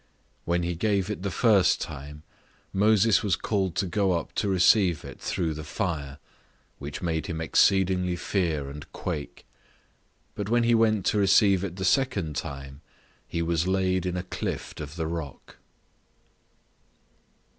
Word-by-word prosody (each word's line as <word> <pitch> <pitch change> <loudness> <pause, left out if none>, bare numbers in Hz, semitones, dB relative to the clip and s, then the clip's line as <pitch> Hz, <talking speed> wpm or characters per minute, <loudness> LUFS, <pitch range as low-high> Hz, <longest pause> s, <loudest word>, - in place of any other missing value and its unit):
When 85 0 0
he 85 +1 -1
gave 100 +2 0
it 105 - -5
the 100 - -2
first 100 -1 +3
time, 75 +2 -7 0.5
Moses 105 +1 +4
was 100 -4 +1
called 95 -5 -1
to - - 0
go 95 +1 +1
up 85 - -3
to 100 - -1
receive 95 -2 +3
it - - -10
through 85 -4 -1
the 75 0 -7
fire, 75 -4 -3 0.6
which 70 +5 -7
made 80 -2 -1
him 80 -1 -4
exceedingly 90 +2 +2
fear 85 -5 -1
and 70 +1 -9
quake: 75 -1 -5 0.9
but 105 0 -4
when 120 +1 +3
he 120 0 +3
went 110 -4 +3
to 105 - +2
receive 100 -1 +4
it 90 -3 -4
the 95 0 -3
second 100 - +1
time, 70 +1 -6 0.5
he 85 - -2
was 85 +1 0
laid 95 -1 +1
in 90 0 -2
a 90 - -3
clift 90 - -5
of 75 +1 -7
the 80 -2 -2
rock. 80 -4 -6
90 Hz, 155 wpm, -26 LUFS, 80-100 Hz, 0.9 s, Moses